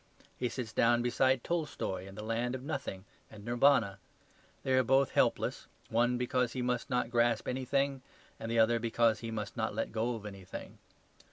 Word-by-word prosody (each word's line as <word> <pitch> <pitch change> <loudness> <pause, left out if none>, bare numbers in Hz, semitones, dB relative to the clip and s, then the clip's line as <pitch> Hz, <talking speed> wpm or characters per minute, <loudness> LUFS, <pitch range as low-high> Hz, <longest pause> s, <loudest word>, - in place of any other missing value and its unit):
He 125 - -1
sits 120 -4 -5
down 120 +1 +3
beside 130 +1 +2
Tolstoy 150 - -2
in 95 - -11
the 105 - -7
land 115 +3 -1
of 130 - -7
nothing 135 -10 -4 0.2
and 105 -1 -12
Nirvana. 120 -5 +3 0.6
They 130 - +1
are 130 - +5
both 135 +2 +3
helpless - - +1 0.2
one 120 +2 +2
because 125 0 0
he 125 - -2
must 125 +1 -1
not 125 -2 0
grasp 120 0 +2
anything, 135 +1 0 0.4
and 115 - -5
the 115 - 0
other 115 +1 +4
because 115 -1 +2
he 115 - -5
must 110 -2 -4
not 110 -3 -2
let 115 - -2
go 115 +2 -1
of 105 -2 -8
anything. 95 -3 -8
120 Hz, 180 wpm, -32 LUFS, 110-130 Hz, 0.6 s, are